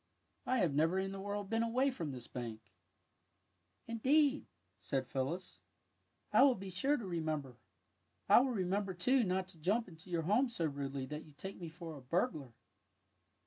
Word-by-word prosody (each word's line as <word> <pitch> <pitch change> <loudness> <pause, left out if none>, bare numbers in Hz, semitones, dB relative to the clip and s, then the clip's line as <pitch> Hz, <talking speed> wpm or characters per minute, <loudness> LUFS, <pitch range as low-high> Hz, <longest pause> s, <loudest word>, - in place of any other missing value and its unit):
I 255 - +2
have 175 - +2
never 160 +5 +3
in 195 0 -1
the 195 - -6
world 205 0 -3
been 225 +2 +1
away 250 +4 +2
from 170 - -4
this 125 -2 -7
bank." 115 -3 -5 0.7
" 90 +1 -44
Indeed/^ 275 +5 +3 0.3
said 135 -2 -1
Phyllis, 140 +8 -3 0.3
'' - - -44
1 - - +6
will 275 -3 +6
be 195 0 -7
sure 275 +11 +2
to 230 - -5
remember. 155 -7 -2 0.7
I - - +8
will 260 +2 +2
remember, 195 -3 -1
too, 250 +8 +3
not 185 -1 0
to 175 -4 -12
jump 205 +8 +1
into 170 0 -13
your 170 -2 0
home 220 - +3
so 175 -8 -1
rudely 140 -2 -3
that 150 +3 -6
you 150 - -16
take 190 -1 -7
me 170 - -5
for 165 -1 -8
a 140 - -10
burglar." 150 - -1
180 Hz, 185 wpm, -35 LUFS, 150-225 Hz, 0.7 s, I